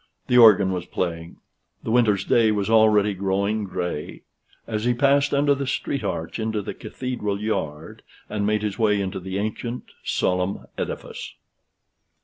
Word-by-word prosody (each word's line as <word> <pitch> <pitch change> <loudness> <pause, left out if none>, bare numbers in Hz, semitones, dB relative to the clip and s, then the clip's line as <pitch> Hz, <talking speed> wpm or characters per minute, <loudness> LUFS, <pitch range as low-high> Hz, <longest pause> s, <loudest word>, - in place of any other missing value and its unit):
The 125 - +2
organ 100 -4 +7
was 90 -1 -4
playing: 85 -2 -4 0.5
the 110 - -3
winter's 110 -5 +3
day 115 -2 +4
was 105 0 -1
already 105 -2 +5
growing 100 +2 -1
gray: 90 -5 -5 0.4
as 110 -1 -3
he 120 0 +2
passed 140 +2 +3
under 145 0 +3
the 140 -1 -3
street 135 -1 -2
arch 85 0 -3
into 110 -1 -2
the - - -5
Cathedral 115 -6 -4
yard, 80 -8 -4 0.3
and 105 -1 -3
made 105 +1 +1
his 105 +1 -3
way 105 -2 +3
into 95 -1 -3
the 95 +1 -5
ancient 115 +4 -4
solemn 90 +1 -1
edifice. - - -6
105 Hz, 150 wpm, -23 LUFS, 95-115 Hz, 0.5 s, organ